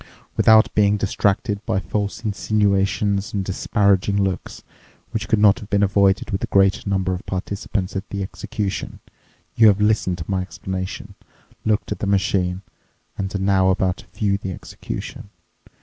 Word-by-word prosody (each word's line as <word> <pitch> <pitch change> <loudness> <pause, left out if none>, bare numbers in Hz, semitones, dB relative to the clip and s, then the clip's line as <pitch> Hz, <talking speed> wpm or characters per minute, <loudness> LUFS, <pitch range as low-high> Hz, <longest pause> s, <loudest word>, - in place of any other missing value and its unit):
Without 110 -1 +5
being 105 0 +3
distracted 100 +2 0
by 95 - 0
false 100 +4 -3
insinuations 100 -1 0
and 100 -2 -1
disparaging 100 +1 +1
looks—which 95 +3 -5
could 110 - +2
not 105 +1 +5
have 105 -3 -11
been 100 -1 +2
avoided 100 0 +2
with 95 - -2
a - - -1
greater 95 +1 +2
number 95 -2 0
of 90 - -5
participants 95 0 -3
at 95 +1 -4
the 100 -1 -3
execution—you 100 +3 -2
have 100 -1 +4
listened 105 -4 +1
to 80 - -6
my 95 -2 0
explanation, 95 0 -6 0.5
looked 110 -1 0
at - - -3
the 100 - -2
machine, 95 -1 0 0.5
and 95 0 -4
are - - +2
now 95 -1 +3
about 95 -1 +1
to - - -15
view 100 -2 -1
the 95 - -5
execution. - - -7
100 Hz, 150 wpm, -21 LUFS, 95-105 Hz, 0.5 s, Without